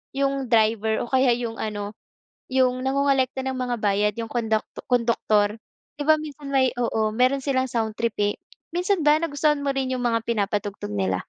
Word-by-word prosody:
yung 275 -1 0
driver 220 -1 +2
o - - -12
kaya 260 -1 +4
yung 230 -2 -4
ano, 210 -1 -4 0.6
yung 255 -1 +2
nangongolekta 270 -1 +1
ng 265 0 -2
mga 245 -1 -1
bayad, 205 +1 +2
yung 225 -1 -5
konduk 220 -3 0 0.2
konduktor. 225 -3 +2 0.4
'Di - - -1
ba 315 - +7
minsan 295 -2 -8
may 260 -2 +3
oo 220 -2 0
meron 255 +3 +3
silang 260 -2 +1
soundtrip 225 0 -1
eh. 205 0 +1 0.4
Minsan 360 +1 +1
ba 295 +1 +6
nagustuhan 300 -2 +1
mo 280 - +1
rin 265 -1 -1
yung 250 -1 -2
mga 230 -1 0
pinapatugtog 205 - -2
nila? 95 -2 0
245 Hz, 170 wpm, -24 LUFS, 220-270 Hz, 0.6 s, ba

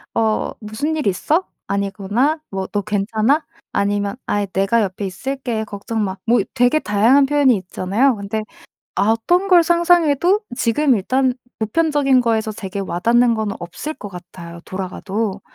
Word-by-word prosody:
"어 220 -1 +1
무슨 225 +9 -3
일 300 - -1
있어? 305 - +1 0.2
아니구나?" 205 +9 0
뭐 190 -1 -3
"너 205 +1 -2
괜찮아?" 215 +8 0 0.3
아니면 200 0 0
"아이 205 0 0
내가 195 +4 +1
옆에 195 +1 -4
있을게. 235 +3 -3
걱정 215 +1 -4
마." 190 -1 -3
뭐 235 -1 +3
되게 250 +4 +3
다양한 230 +5 +4
표현이 280 -3 +3
있잖아요. 200 +7 0
근데 205 +2 -3 0.5
어떤 225 - +2
걸 355 -2 +7
상상해도 345 +1 +3 0.2
지금 260 +5 +2
일단 255 +6 +1 0.2
보편적인 275 +2 +2
거에서 225 -2 0
되게 200 -2 -6
와 180 -3 -3
닿는 235 +4 +3
건 220 -2 -2
없을 175 - -6
것 205 - -8
같아요, 175 -2 -10
돌아가도. 195 +2 -4
220 Hz, 305 characters per minute, -19 LUFS, 200-270 Hz, 0.5 s, 걸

